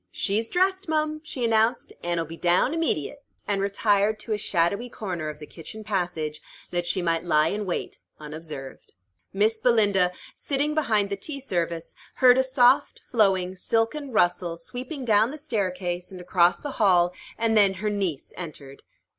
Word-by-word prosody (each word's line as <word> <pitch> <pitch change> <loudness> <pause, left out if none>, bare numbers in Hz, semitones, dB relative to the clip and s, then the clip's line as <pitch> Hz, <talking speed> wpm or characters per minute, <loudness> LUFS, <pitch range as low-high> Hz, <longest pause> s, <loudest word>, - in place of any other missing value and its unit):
"She's 220 +3 -1
dressed, 380 0 +1
mum," 310 0 0
she 265 -6 -3
announced, 225 +1 +1
"an' 175 0 -1
'll 165 - -1
be 165 +1 -8
down 175 - +2
immediate," 285 - -1 0.2
and 200 -1 0
retired 205 +1 +2
to 225 - -3
a - - 0
shadowy 200 +7 0
corner 180 -9 -4
of 150 - -7
the 150 - -9
kitchen 180 +8 -9
passage, 175 -7 -2 0.3
that 175 0 -1
she 185 -1 0
might 165 -1 0
lie 155 -2 +3
in 205 -1 -3
wait 175 - -3 0.2
unobserved. 150 - -9 0.4
Miss 215 +3 +2
Belinda, 205 -7 +3 0.2
sitting 290 +1 -1
behind 215 -10 +1
the - - 0
tea 280 +8 -6
service, 170 -9 -3 0.2
heard 255 0 +6
a - - +4
soft, 260 -1 +3
flowing, 190 -5 +2
silken 230 +9 0
rustle 175 -4 +1
sweeping 255 - -6
down 220 0 +4
the 300 - -7
staircase, 185 - -2
and 185 - -9
across 180 0 +3
the 290 - -6
hall, 180 -3 +4 0.2
and 225 0 +1
then 200 -2 +5
her 210 +3 -2
niece 190 -9 -2
entered. 145 -5 -9
200 Hz, 165 wpm, -25 LUFS, 175-240 Hz, 0.4 s, heard